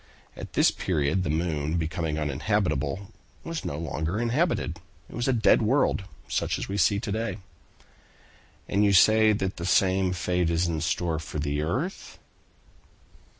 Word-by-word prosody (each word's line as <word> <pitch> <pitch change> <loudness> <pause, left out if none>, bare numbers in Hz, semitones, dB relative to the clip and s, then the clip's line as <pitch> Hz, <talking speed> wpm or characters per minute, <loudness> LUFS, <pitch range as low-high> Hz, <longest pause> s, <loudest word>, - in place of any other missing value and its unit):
At - - -9
this - - +4
period 80 +1 0
the 90 - -2
moon 80 -1 -1
becoming 80 -1 -2
uninhabitable, 75 +2 -1 0.3
was 165 -1 -5
no 70 - -4
longer 80 +4 -3
inhabited. 120 - 0 0.3
It - - -14
was 120 +2 -2
a - - +4
dead 115 -2 +4
world, 110 -3 +1 0.2
such - - -1
as - - -5
we 100 - -4
see 100 0 +3
it 100 - -3
to 105 - -3
day." 110 +2 -2 1.3
"And 100 +1 +2
you 100 -1 +4
say 110 +3 +6
that 95 -2 -2
the 85 - -4
same 95 0 +3
fate 90 -1 0
is 85 +1 +1
in 80 -2 -2
store 85 -1 -1
for 80 -1 -7
the 75 0 -1
earth?" 130 - -3
90 Hz, 160 wpm, -26 LUFS, 80-105 Hz, 1.3 s, say